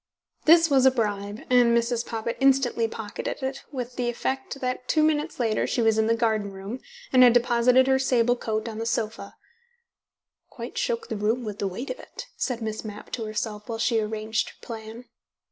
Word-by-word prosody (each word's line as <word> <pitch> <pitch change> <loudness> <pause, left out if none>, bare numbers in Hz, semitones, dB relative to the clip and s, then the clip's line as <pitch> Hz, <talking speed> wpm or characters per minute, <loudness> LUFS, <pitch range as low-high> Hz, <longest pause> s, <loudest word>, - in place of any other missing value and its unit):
This 330 +1 +7
was 265 -3 +5
a - - +9
bribe, 210 -4 -2
and 240 -2 +5
Mrs. 235 0 0
Poppit 230 0 -4
instantly 265 -4 +3
pocketed 225 +4 -6
it, 265 +1 -3
with 250 -3 -5
the 245 -1 0
effect 265 +3 -3
that 250 -1 -3
two 310 - +3
minutes 310 0 0
later 225 -3 +1
she - - -1
was 225 -1 +3
in 220 - +2
the 230 - +3
garden 220 -3 0
room, 195 +6 -7 0.3
and 255 - +7
had 245 -2 +8
deposited 245 +1 +4
her 265 0 +3
sable 245 -2 +2
coat 220 -2 -3
on 220 -1 -5
the 230 - -2
sofa 225 0 -3 1.1
("Quite - - -8
shook 465 -2 -1
the - - -2
room 220 +4 0
with 210 -1 -6
the 200 - 0
weight 235 +9 -5
of - - -6
it," - - -9
said 245 -4 -2
Miss 220 0 -4
Mapp 210 -1 -9
to 230 - -3
herself 215 0 -4
while 225 - -2
she 225 0 +2
arranged 215 0 -2
her - - -16
plan). 225 +1 -8
235 Hz, 195 wpm, -25 LUFS, 220-255 Hz, 1.1 s, a